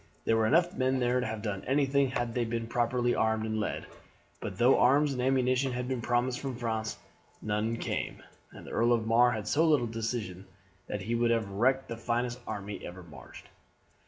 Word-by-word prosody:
There 115 - +3
were 110 -1 +3
enough 175 +8 +3
men 130 +1 +1
there 125 0 +2
to 125 - -1
have 110 -1 -5
done 100 -3 -3
anything 140 0 +2
had 120 -2 -2
they 120 - 0
been 115 0 -2
properly 120 +1 +1
armed 110 0 +1
and 110 0 -2
led; 105 - -3 0.5
but - - -6
though 125 +3 +5
arms 140 +3 +4
and 125 - -3
ammunition 130 0 +2
had 125 0 -3
been 130 -2 -2
promised 120 +1 0
from 135 -3 -4
France, 110 -2 -3 0.4
none 110 +2 -1
came, - - -4 0.3
and - - -12
the - - -9
Earl 120 +1 +3
of 115 -2 0
Mar 120 +2 +5
had 110 -1 -4
so 150 +8 +3
little 150 -7 +3
decision 110 -5 -4 0.4
that 105 - -4
he 115 +4 -3
would 120 0 +2
have 115 -4 0
wrecked 130 +7 +1
the 115 - -5
finest 120 +1 -2
army 100 0 -5
that - - -10
ever 90 +1 -9
marched. 75 -7 -13
120 Hz, 205 wpm, -30 LUFS, 110-125 Hz, 0.5 s, though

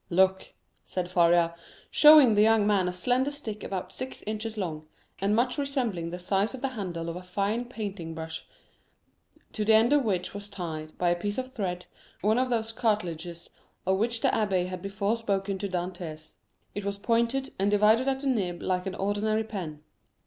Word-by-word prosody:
"Look!" 190 +2 +2 0.3
said 180 -1 -3
Faria, 170 -1 +4 0.4
showing 300 -4 +9
to - - +3
the 205 - +4
young 220 -1 +5
man 200 -3 +3
a - - 0
slender 250 +9 +1
stick 230 -8 -6
about 190 -2 -4
six 255 0 -6
inches 215 +1 -4
long, 155 -6 -4 0.3
and 200 +2 +2
much 250 +5 +1
resembling 245 - -1
the 175 - -5
size 195 +6 0
of 255 - -10
the 270 - 0
handle 180 -9 -4
of 170 - -4
a 180 - -6
fine 200 +6 -1
painting 200 -9 -6
brush, 160 0 -6 1.0
to 215 - -2
the 220 +1 +5
end 230 +5 +5
of 290 -2 +4
which 185 -5 -1
was 205 0 -7
tied, 160 -5 -6
by 175 - +2
a 175 - +3
piece 205 +4 -3
of 260 0 -4
thread, 180 -4 -3 0.4
one 215 +4 +3
of 255 0 +1
those 225 -2 0
cartilages 175 -7 -2 0.3
of 190 +1 +2
which 230 +1 0
the - - +3
abbé 195 -4 +1
had 185 -1 -6
before 200 +3 -1
spoken 195 -3 -1
to 200 - -3
Dantès; 175 -3 -5 0.4
it 205 - -4
was 200 0 -2
pointed, 235 +5 0
and 195 +1 +2
divided 215 +5 +4
at 270 0 0
the - - -6
nib 190 -9 0
like 185 0 -1
an 190 - -3
ordinary 210 +2 0
pen. 170 -9 -6
200 Hz, 190 wpm, -28 LUFS, 180-225 Hz, 1.0 s, showing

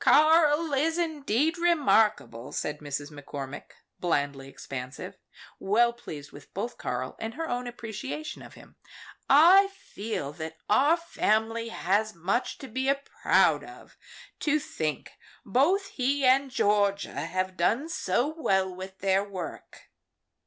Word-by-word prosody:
"Karl 310 0 +5
is 320 +5 +1
indeed 315 -1 0
remarkable," 225 - +2
said 150 0 -3
Mrs. 145 0 -5
McCormick, 145 -1 -8 0.3
blandly 140 -5 -1
expansive, 135 -1 -8 0.4
well 235 +4 +3
pleased 145 -11 -9
with 145 0 -14
both 235 +5 -3
Karl 125 +1 -3
and 225 +1 -5
her 325 +2 -3
own 245 0 -3
appreciation 240 +6 -6
of - - -12
him. - - -17 0.5
"I 355 +8 +7
feel 220 - -6
that 160 +1 -7
our 285 +10 +4
family 230 -8 0
has 210 +1 0
much 195 +9 -1
to 270 - -9
be 260 +3 0 0.3
proud - - +4
of, - - -13 0.4
to 305 0 +2
think 155 - -4 0.3
both 340 - +2
he 275 +2 0
and 265 +2 +4
Georgia 205 -4 +1
have 185 0 -2
done 225 - +1
so 245 - 0
well 190 - +1
with 190 +1 -9
their 195 0 +2
work." 190 -5 -8
220 Hz, 130 wpm, -28 LUFS, 175-285 Hz, 0.5 s, I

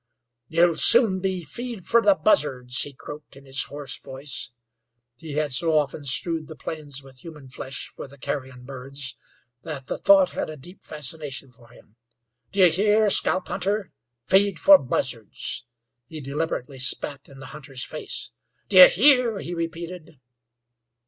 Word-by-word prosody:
"You'll 170 +2 +2
soon 225 -6 +6
be 185 -1 -3
feed 230 - -8
fer 235 - +3
the 300 +4 +4
buzzards," 130 - +1
he 145 - -1
croaked, 145 +2 -12
in 140 0 -16
his 135 0 -1
hoarse 145 -3 -6
voice. 135 -1 -6 0.7
He 155 +3 -9
had 150 -1 -1
so 160 +4 +3
often 145 0 -2
strewed 160 +4 +1
the 160 - -10
plains 145 -3 -6
with 135 -1 -16
human 150 -4 -12
flesh 130 +1 -7
for - - -8
the 140 +1 -17
carrion 130 -2 -6
birds 135 +1 -6 0.5
that 140 -3 -7
the - - -5
thought 195 -2 +5
had - - -4
a 155 - -8
deep 175 +8 -15
fascination 145 -2 -6
for 120 -1 -18
him. 115 -2 -21 0.5
"D'ye 190 -3 +5
hear, 210 +4 +2
scalp 185 -1 +3
hunter? 195 0 -1 0.3
Feed 195 -1 +3
for 190 +6 +7
buzzards!" 125 -2 -2 0.4
He 160 +2 -9
deliberately 140 -1 -4
spat 140 +2 +1
in 135 - -15
the 135 - -11
hunter's 135 -3 -5
face. - - -5 0.4
"D'ye - - +10
hear?" 255 - +3
he 175 -2 -6
repeated. 165 -2 -7
150 Hz, 155 wpm, -24 LUFS, 135-185 Hz, 0.7 s, D'ye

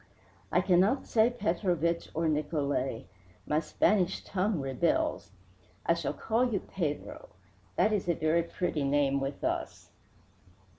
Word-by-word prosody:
"I 180 - +4
cannot 190 +8 +3
say 225 +1 +3
Petrovich 175 - 0
or 165 +1 +1
Nicolai 145 -5 -1 0.4
my 150 - +1
Spanish 185 +4 +1
tongue 195 -1 -1
rebels. 170 - 0 0.6
I - - +4
shall - - -2
call 235 +3 +1
you 200 - +1
Pedro. 180 - -4 0.5
That 215 - +3
is 195 -4 -1
a 170 - +3
very 155 +2 +2
pretty 170 -2 -2
name 140 0 +2
with 135 +1 -4
us." - - -3
170 Hz, 130 wpm, -30 LUFS, 150-205 Hz, 0.6 s, I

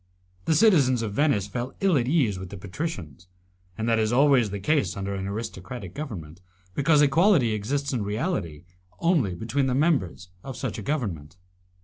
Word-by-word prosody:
The 160 - +2
citizens 145 - +4
of 105 -3 -3
Venice 140 -7 +2
felt 120 +5 -5
ill 195 -4 +3
at 125 -3 +1
ease 130 - +1
with 95 -1 -7
the 100 - -8
patricians, 90 - -6 0.5
and 110 - -2
that 115 -1 +3
is 110 0 +1
always 130 -3 +4
the 100 0 -4
case 105 - 0
under 100 0 -3
an 95 0 -4
aristocratic 100 -1 -6
government, 90 - -7 0.3
because 145 - +4
equality 145 - +4
exists 140 +7 -2
in 120 - -1
reality 105 - -3 0.3
only 150 - +1
between 120 +8 -1
the 125 - 0
members 135 - 0
of 135 -2 -7
such 125 -5 -4
a - - -5
government. 95 - -3
115 Hz, 170 wpm, -25 LUFS, 100-145 Hz, 0.5 s, citizens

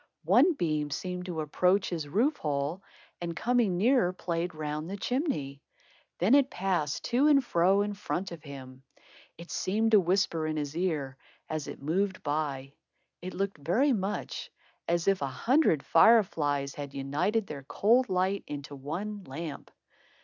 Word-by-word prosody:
One 360 - +5
beam 155 - -1
seemed 180 +4 -4
to 165 -3 -3
approach 180 +6 +1
his 160 -4 -3
roof 240 - +1
hole, 145 +4 -2 0.4
and 170 -1 -4
coming 230 -4 +1
nearer 230 -2 +3
played 175 -1 -3
round 155 +1 -4
the 200 - -4
chimney. 200 - -2 0.6
Then 190 +8 +3
it 275 -1 +5
passed 180 -6 -1
to 255 +5 +2
and 280 -3 +5
fro 190 +1 +3
in 205 0 -3
front 195 -2 -4
of 170 -2 -8
him. 130 -3 -10 0.6
It 170 +1 -11
seemed 220 +4 0
to 215 - +7
whisper 180 -3 +1
in 155 0 -2
his 145 0 -3
ear, 155 -7 -2 0.3
as 155 -2 -4
it - - -8
moved 190 +5 -1
by. 145 -2 -2 0.5
It 185 +1 -6
looked 195 -3 -2
very 235 - +2
much 200 -2 -3 0.4
as 170 +1 0
if 195 -4 +3
a 140 - 0
hundred 230 - +2
fire 225 -1 +6
flies 145 -6 -2
had 140 -1 -7
united 165 +11 0
their 150 -6 -7
cold 230 - +2
light 185 +2 0
into 145 0 -7
one 185 +9 -5
lamp. 150 +2 -7
175 Hz, 160 wpm, -29 LUFS, 150-200 Hz, 0.6 s, to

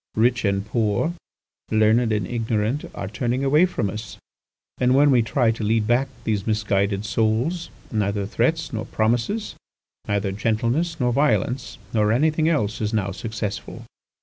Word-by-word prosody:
Rich 120 +1 +2
and 100 0 0
poor, 110 +7 0 0.6
learned 110 +2 +3
and 105 -3 0
ignorant 115 +3 -1
are 100 - -4
turning 120 +5 -1
away 150 +6 +4
from 120 - -2
us. 105 +2 -6 0.6
And 125 +1 +3
when 145 +1 +5
we 125 -3 +5
try 115 +1 +2
to 115 -1 -5
lead 110 0 +2
back 120 +4 +2 0.2
these 105 -2 -1
misguided 100 -2 0
souls, 115 +11 0 0.2
neither 100 -2 0
threats 125 +11 0
nor 110 -1 -3
promises, 120 - 0 0.5
neither 100 -1 0
gentleness 115 - 0
nor 125 -2 +1
violence, 125 -2 0 0.2
nor 105 -1 +3
anything 155 +6 +2
else 110 -10 0
is 105 +1 -1
now 100 -2 0
successful. 110 0 -5
110 Hz, 150 wpm, -23 LUFS, 105-125 Hz, 0.6 s, when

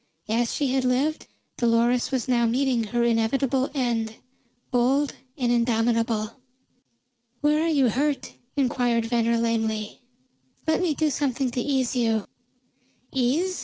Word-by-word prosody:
As 230 +1 +1
she 275 -3 0
had 265 -1 +1
lived, 265 +5 0 0.3
Dolores 235 +1 +2
was 260 -2 -1
now 240 -2 +2
meeting 250 -1 +1
her 240 +3 0
inevitable 240 +3 +1
end, 230 -4 -1 0.6
bold 265 +4 +2 0.2
and 245 -3 +1
indomitable. 230 -2 +1 1.0
"Where 300 +1 +3
are - - +1
you 280 -5 +3
hurt?" 275 +2 -1 0.2
inquired 245 -4 +1
Venner 235 0 +1
lamely. 220 -2 -1 0.6
"Let 315 +3 +1
me 335 -5 +1
do 310 0 +1
something 265 -3 -1
to 245 - -2
ease 265 -1 0
you." 225 -4 +1 0.9
"Ease?" 290 +9 +1
245 Hz, 130 wpm, -25 LUFS, 230-270 Hz, 1.0 s, Where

